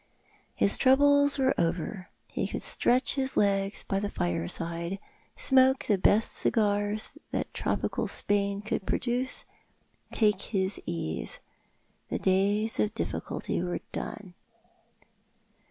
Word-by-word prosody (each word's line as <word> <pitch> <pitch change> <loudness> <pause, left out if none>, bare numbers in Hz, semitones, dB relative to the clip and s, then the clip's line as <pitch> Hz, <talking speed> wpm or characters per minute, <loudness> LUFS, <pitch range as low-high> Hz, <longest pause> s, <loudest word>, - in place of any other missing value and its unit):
His 200 - +3
troubles 285 +2 +5
were 265 -1 +3
over. 180 +3 -2 0.2
He - - -1
could - - -3
stretch 250 +2 +2
his 265 -1 -1
legs 195 -1 +2
by 195 - -1
his 205 0 -3
fireside, 165 - -1 0.4
smoke 265 0 +4
the 205 -3 +2
best 210 +4 +3
cigars 205 0 0 0.2
that - - -3
tropical - - -1
Spain 200 0 0
could 205 -2 -3
produce, 250 +1 -1 0.7
take 210 -3 +2
his 195 -2 -2
ease. 125 - -2 0.7
The - - -1
days 200 +4 +1
of 215 +1 0
difficulty 225 - -3
were 175 0 -3
done. 195 -5 -6
205 Hz, 115 wpm, -28 LUFS, 190-240 Hz, 0.7 s, troubles